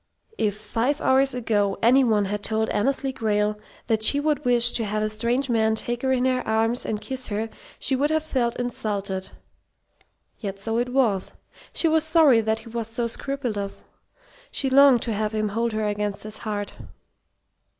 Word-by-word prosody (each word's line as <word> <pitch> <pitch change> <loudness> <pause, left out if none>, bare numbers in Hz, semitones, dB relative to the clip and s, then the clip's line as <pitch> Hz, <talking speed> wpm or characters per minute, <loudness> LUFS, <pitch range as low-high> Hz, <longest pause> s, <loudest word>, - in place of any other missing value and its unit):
If, 210 -1 0
five 230 +7 -1
hours 265 0 +3
ago, 205 -5 0
any 255 +4 +5
one 215 -4 +2
had 205 +1 -3
told 220 +1 0
Annesley 270 +4 0
Grayle 210 -3 0 0.3
that 220 -2 0
she 280 +6 +5
would 295 -1 0
wish 240 -1 +5
to 230 - -1
have 215 0 -2
a 215 - 0
strange 235 +5 0
man 220 -2 +2
take 240 +2 -1
her 265 - 0
in 255 -1 +1
his 255 -1 +1
arms 225 +2 0
and 210 - -2
kiss 260 +2 -4
her 220 +1 -3 0.3
she 270 - +2
would 285 +3 +1
have 315 0 +1
felt 250 -6 -1
insulted. 200 -5 -3 1.1
Yet 200 -3 -5
so 225 +3 -2
it 245 +1 -1
was. 235 -8 +1 0.4
She 330 - +1
was 320 -1 +3
sorry 315 -7 +5
that 220 0 -1
he 230 - -12
was 230 -1 -4
so 230 +1 -3
scrupulous. 235 -5 -4 0.7
She 270 -1 -1
longed 270 -3 +6
to 230 - -2
have 215 +1 -2
him 215 -1 0
hold 230 +3 -1
her 215 0 -1
against 205 -1 -3
his 215 0 -6
heart. 205 -2 -4
230 Hz, 180 wpm, -24 LUFS, 215-260 Hz, 1.1 s, longed